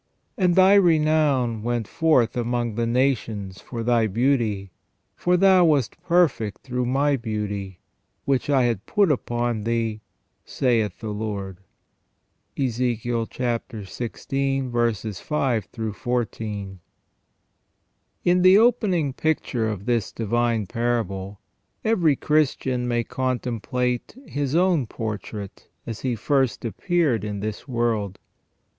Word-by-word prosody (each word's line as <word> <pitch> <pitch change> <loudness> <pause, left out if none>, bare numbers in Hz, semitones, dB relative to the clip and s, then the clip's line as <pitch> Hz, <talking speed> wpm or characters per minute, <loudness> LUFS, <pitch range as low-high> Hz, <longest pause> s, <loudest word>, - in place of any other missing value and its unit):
And 180 -7 +2
thy 190 +1 +6
renown 155 - +3
went 120 -1 -2
forth 135 -8 +2
among 120 -1 -1
the 115 +2 -1
nations 115 -7 -1
for 115 -2 -6
thy 115 -1 +3
beauty; 110 -4 0 0.4
for 180 0 +2
thou 190 -1 +6
wast 145 -7 +1
perfect 165 - +1
through 125 -1 -2
My 140 +3 +2
beauty, 105 -5 -4 0.4
which 135 +1 0
I 135 -3 +4
had 115 -5 -1
put 200 -5 +3
upon 120 -4 -1
thee, 115 -1 -1 0.4
saith 115 -7 0
the 110 -1 -4
Lord." 100 -3 -4 0.5
— - - -47
EzECHiEL 120 -2 -1
xvi. 120 -1 -2
5 125 - -1 0.3
14. 105 -5 -3 1.5
IN 180 +1 +4
the 185 +2 +7
opening 190 - +2
picture 130 -6 -1
of 100 -2 -5
this 120 -5 0
divine 115 0 0
parable 100 -3 -2 0.5
every 175 -10 +3
Christian 130 -4 0
may 120 -1 +1
comtemplate 125 - -2
his 145 0 -2
own 175 -7 +3
portrait 105 -2 -6 0.2
as 115 -1 -5
he 125 -2 -1
first 130 +1 0
appeared 145 - 0
in 105 -2 -4
this 110 +4 -5
world. 115 -6 -1
120 Hz, 115 wpm, -24 LUFS, 110-140 Hz, 1.5 s, the